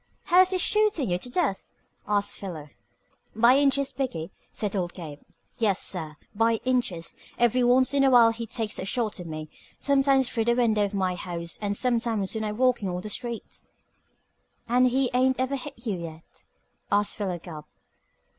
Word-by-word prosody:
"How 360 Hz, 0 st, +5 dB
is 370 Hz, -, +4 dB
he 375 Hz, -, 0 dB
shootin' 410 Hz, -, +1 dB
you 175 Hz, -, +1 dB
to 245 Hz, -, -7 dB
death?" 265 Hz, -, -1 dB, 0.4 s
asked 205 Hz, -1 st, +1 dB
Philo. 160 Hz, -7 st, -7 dB, 0.7 s
"By 240 Hz, +4 st, +5 dB
inches, 280 Hz, -1 st, +2 dB
b'gee," 240 Hz, -12 st, -3 dB, 0.2 s
said 210 Hz, -1 st, -3 dB
old 180 Hz, -3 st, -2 dB
Gabe. 155 Hz, -5 st, -8 dB, 0.4 s
"Yes, 210 Hz, -5 st, +1 dB
sir, 155 Hz, -5 st, -3 dB, 0.2 s
by 225 Hz, +2 st, +2 dB
inches. 240 Hz, -10 st, 0 dB, 0.2 s
Every 240 Hz, +1 st, +3 dB
once 255 Hz, +2 st, +4 dB
in 280 Hz, -1 st, +3 dB
a 270 Hz, -, +5 dB
while 235 Hz, -3 st, +7 dB
he 230 Hz, 0 st, -6 dB
takes 220 Hz, -1 st, -2 dB
a -, -, -4 dB
shot 220 Hz, -1 st, -1 dB
at 175 Hz, -, -7 dB
me. 155 Hz, -1 st, -6 dB, 0.3 s
Sometimes 270 Hz, -2 st, +3 dB
through 225 Hz, -2 st, -1 dB
the 235 Hz, 0 st, +3 dB
window 220 Hz, -4 st, +2 dB
of 200 Hz, 0 st, -5 dB
my 185 Hz, -2 st, 0 dB
house, 170 Hz, -1 st, -5 dB
and 200 Hz, -1 st, -1 dB
sometimes 230 Hz, -5 st, 0 dB
when 220 Hz, -1 st, -3 dB
I'm 210 Hz, 0 st, -3 dB
walkin' 245 Hz, -6 st, +2 dB
on 180 Hz, 0 st, -3 dB
the 215 Hz, -, -7 dB
street." 235 Hz, +2 st, -5 dB, 1.1 s
"And 250 Hz, +2 st, +4 dB
he 255 Hz, +1 st, +1 dB
ain't 260 Hz, +1 st, +2 dB
ever 260 Hz, +2 st, 0 dB
hit 275 Hz, 0 st, -8 dB
you 200 Hz, -6 st, -2 dB
yet?" 165 Hz, -1 st, -10 dB, 0.5 s
asked 205 Hz, 0 st, +2 dB
Philo 190 Hz, -4 st, -3 dB
Gubb. 160 Hz, -3 st, -10 dB
225 Hz, 180 wpm, -26 LUFS, 185-255 Hz, 1.1 s, while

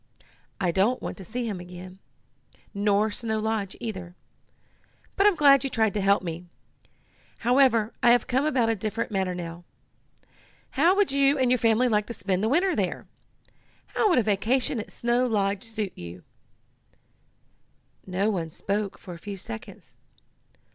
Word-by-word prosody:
I 180 Hz, -3 st, +1 dB
don't 200 Hz, +8 st, +2 dB
want -, -, -5 dB
to 195 Hz, -, -9 dB
see 240 Hz, +6 st, -4 dB
him 205 Hz, -5 st, -3 dB
again, 180 Hz, +1 st, -10 dB, 0.7 s
nor 205 Hz, +1 st, +2 dB
Snow 220 Hz, 0 st, -2 dB
Lodge 215 Hz, -3 st, -2 dB
either. 190 Hz, -7 st, -6 dB, 1.0 s
But 395 Hz, -, +4 dB
I'm 410 Hz, -, +4 dB
glad 280 Hz, -4 st, +6 dB
you 270 Hz, -, -1 dB
tried 220 Hz, -5 st, +1 dB
to 205 Hz, -, -1 dB
help 200 Hz, 0 st, +3 dB
me. 170 Hz, 0 st, -6 dB, 0.9 s
However, 240 Hz, -3 st, +3 dB
I 240 Hz, -, +5 dB
have 240 Hz, +1 st, +4 dB
come 265 Hz, +2 st, +1 dB
about 260 Hz, -6 st, +2 dB
a 225 Hz, -, +2 dB
different 215 Hz, +3 st, -3 dB
matter 190 Hz, -3 st, -1 dB
now. 170 Hz, 0 st, -7 dB, 1.1 s
How 335 Hz, +7 st, +3 dB
would 405 Hz, -6 st, +2 dB
you 275 Hz, +1 st, +3 dB
and 255 Hz, -2 st, +2 dB
your 250 Hz, -, +3 dB
family 230 Hz, +2 st, +3 dB
like 210 Hz, -3 st, +1 dB
to 235 Hz, -, -5 dB
spend 190 Hz, -1 st, -1 dB
the 220 Hz, -, +2 dB
winter 355 Hz, +7 st, +2 dB
there? -, -, -2 dB, 0.8 s
How 430 Hz, -, +1 dB
would 350 Hz, -, +3 dB
a 245 Hz, -, +4 dB
vacation 225 Hz, +5 st, +1 dB
at 210 Hz, -, -6 dB
Snow 240 Hz, +1 st, +1 dB
Lodge 200 Hz, -3 st, 0 dB
suit 215 Hz, -4 st, -4 dB
you?" 85 Hz, +1 st, -9 dB, 1.8 s
No 190 Hz, +4 st, 0 dB
one 170 Hz, -5 st, -3 dB
spoke 200 Hz, +4 st, -3 dB
for 180 Hz, -, -10 dB
a 170 Hz, -, -10 dB
few 200 Hz, +1 st, -7 dB
seconds. 110 Hz, -11 st, -9 dB
215 Hz, 160 wpm, -26 LUFS, 190-250 Hz, 1.8 s, glad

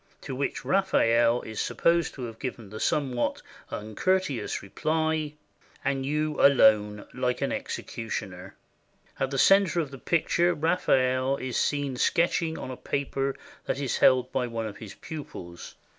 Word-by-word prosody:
To -, -, -6 dB
which 140 Hz, +1 st, -3 dB
Raphael 120 Hz, -11 st, +3 dB
is 110 Hz, -1 st, -4 dB
supposed 170 Hz, -1 st, +1 dB
to 130 Hz, -, -6 dB
have 115 Hz, -2 st, -7 dB
given 115 Hz, -6 st, -6 dB
the 110 Hz, -, -7 dB
somewhat 130 Hz, -5 st, 0 dB, 0.3 s
uncourteous 130 Hz, -, -1 dB
reply, 155 Hz, +6 st, -1 dB, 0.5 s
"And 135 Hz, -1 st, 0 dB
you 150 Hz, +1 st, 0 dB
alone, 105 Hz, -6 st, +5 dB
like 125 Hz, -1 st, -1 dB
an -, -, 0 dB
executioner." 95 Hz, -5 st, -5 dB, 0.6 s
In 135 Hz, -, 0 dB
the 135 Hz, -, -3 dB
center 185 Hz, +3 st, +5 dB
of 150 Hz, -5 st, -2 dB
the 135 Hz, -, -9 dB
picture 170 Hz, +4 st, +2 dB
Raphael 135 Hz, -5 st, +2 dB
is 130 Hz, -3 st, -4 dB
seen 140 Hz, -3 st, 0 dB
sketching 165 Hz, +1 st, +1 dB
on 130 Hz, -, -6 dB
a 125 Hz, -, -7 dB
paper 135 Hz, -1 st, -2 dB, 0.3 s
that -, -, -2 dB
is 140 Hz, -3 st, -1 dB
held 130 Hz, -1 st, +4 dB
by 125 Hz, -2 st, 0 dB
one 115 Hz, -1 st, -3 dB
of 105 Hz, -2 st, -6 dB
his 105 Hz, -3 st, -10 dB
pupils. 85 Hz, -, -9 dB
135 Hz, 145 wpm, -27 LUFS, 115-155 Hz, 0.6 s, alone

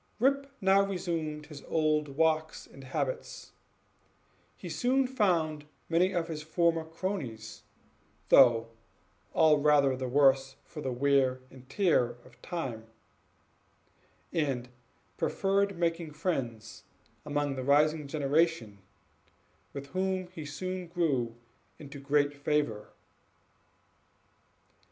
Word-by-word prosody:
Rip 275 Hz, +3 st, +2 dB
now 195 Hz, +1 st, +5 dB
resumed 165 Hz, -6 st, -3 dB
his 145 Hz, -2 st, -10 dB
old 155 Hz, -1 st, +1 dB
walks 160 Hz, -1 st, +1 dB
and 135 Hz, -1 st, -14 dB
habits; 475 Hz, -, -4 dB, 1.1 s
he -, -, -8 dB
soon 260 Hz, +2 st, +1 dB
found 170 Hz, -, 0 dB, 0.2 s
many 175 Hz, +3 st, +3 dB
of 170 Hz, -3 st, -1 dB
his 155 Hz, -2 st, -5 dB
former 165 Hz, +1 st, +1 dB
cronies, 160 Hz, -, -5 dB, 0.7 s
though 115 Hz, -1 st, +6 dB, 0.7 s
all 155 Hz, -2 st, +5 dB
rather 145 Hz, -2 st, +4 dB
the 130 Hz, 0 st, -4 dB
worse 135 Hz, 0 st, +3 dB
for 155 Hz, -, -9 dB
the 130 Hz, -, -2 dB
wear 130 Hz, 0 st, +2 dB
and 130 Hz, 0 st, -15 dB
tear 130 Hz, -, +2 dB
of 125 Hz, -1 st, -19 dB
time; 125 Hz, -11 st, -5 dB, 1.5 s
and 135 Hz, -7 st, -1 dB, 0.5 s
preferred 195 Hz, 0 st, 0 dB
making 165 Hz, -2 st, -1 dB
friends 120 Hz, -, -4 dB, 0.4 s
among 145 Hz, -1 st, -1 dB
the 130 Hz, -1 st, -4 dB
rising 150 Hz, +2 st, +3 dB
generation, 145 Hz, -7 st, 0 dB, 0.9 s
with 140 Hz, 0 st, -7 dB
whom 185 Hz, +1 st, -1 dB
he 160 Hz, -5 st, -8 dB
soon 185 Hz, +4 st, -5 dB
grew 140 Hz, -10 st, 0 dB, 0.4 s
into 140 Hz, -1 st, -10 dB
great 145 Hz, +1 st, +1 dB
favor. 145 Hz, -6 st, -1 dB
150 Hz, 105 wpm, -30 LUFS, 135-170 Hz, 1.5 s, though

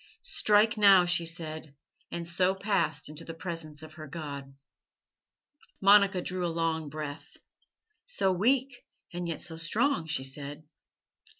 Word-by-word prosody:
"'Strike 215 Hz, +1 st, +3 dB
now,' 195 Hz, -3 st, +7 dB
she 170 Hz, -1 st, 0 dB
said, 160 Hz, -3 st, -3 dB, 0.3 s
and 170 Hz, -1 st, -5 dB
so 180 Hz, +2 st, +2 dB
passed 190 Hz, -7 st, 0 dB
into 150 Hz, +2 st, -9 dB
the 165 Hz, 0 st, -8 dB
presence 165 Hz, -3 st, -6 dB
of 155 Hz, -1 st, -11 dB
her 155 Hz, -1 st, -9 dB
God." 140 Hz, -3 st, -7 dB, 1.2 s
Monica 200 Hz, -2 st, +5 dB
drew 180 Hz, 0 st, -3 dB
a -, -, +1 dB
long 165 Hz, -2 st, -1 dB
breath. 145 Hz, -1 st, -7 dB, 0.7 s
"So 195 Hz, -, +1 dB
weak 245 Hz, +7 st, +1 dB, 0.3 s
and 175 Hz, 0 st, -3 dB
yet 165 Hz, -, -4 dB
so 165 Hz, -2 st, -5 dB
strong," 180 Hz, -, 0 dB
she 150 Hz, -4 st, -1 dB
said. 145 Hz, +3 st, -6 dB
170 Hz, 135 wpm, -29 LUFS, 155-190 Hz, 1.2 s, now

